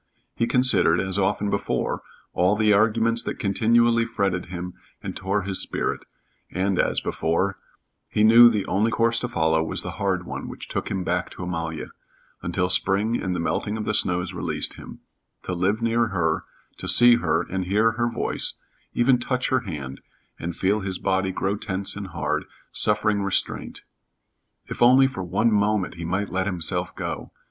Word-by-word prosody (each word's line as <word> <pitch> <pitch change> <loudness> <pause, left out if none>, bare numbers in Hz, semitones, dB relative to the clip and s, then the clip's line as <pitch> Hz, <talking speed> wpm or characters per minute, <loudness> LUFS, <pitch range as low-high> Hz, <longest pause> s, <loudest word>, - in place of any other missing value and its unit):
He 115 - 0
considered, 125 -9 +3
as 95 +1 -1
often 100 +1 0
before, 100 - -1 0.3
all 90 +3 +2
the 105 -1 +3
arguments 115 +2 +2
that - - -4
continually 115 +3 +3
fretted 100 -6 -2
him 90 0 -6 0.3
and - - -6
tore 95 +1 -1
his 95 -1 -1
spirit; - - -2 0.5
and, 95 0 -1
as - - +2
before, 90 +4 -1 0.5
he 105 - +1
knew 115 +2 +8
the 105 -4 -1
only 105 +4 +1
course 115 +1 +1
to 125 - -3
follow 80 -9 +1
was 80 - -3
the - - -5
hard 95 -3 0
one - - -6
which - - -8
took - - -3
him 95 -2 -2
back 90 0 -1
to - - -8
Amalia, 85 -3 -4 0.5
until 90 - -1
spring 100 +5 +2
and 90 -1 -2
the - - -2
melting 105 +5 -2
of 110 - -4
the 110 - -1
snows 90 -2 +1
released 90 - -1
him - - -12 0.4
to 90 - -3
live 100 +6 0
near 115 0 +2
her, 85 -6 -1 0.3
to - - -6
see 120 0 +7
her 80 -2 0
and 95 +1 -4
hear 105 +4 +2
her 120 +1 -1
voice, 115 - -1 0.4
even 125 +1 +3
touch 130 +1 -1
her 130 - +2
hand, 75 - -7 0.4
and 85 0 -4
feel 100 +3 +1
his 95 -2 -3
body 95 0 0
grow 95 +2 -1
tense 100 -2 -2
and 100 -1 -6
hard, - - -2 0.3
suffering 105 -1 +1
restraint. 100 -1 -2 0.8
If - - -7
only 130 +3 +7
for 130 -8 -3
one 95 +6 +1
moment 105 -1 +1
he 85 -1 -7
might 95 +4 -2
let 95 +1 -1
himself 90 -1 -2
go! - - -5
100 Hz, 175 wpm, -24 LUFS, 90-115 Hz, 0.8 s, knew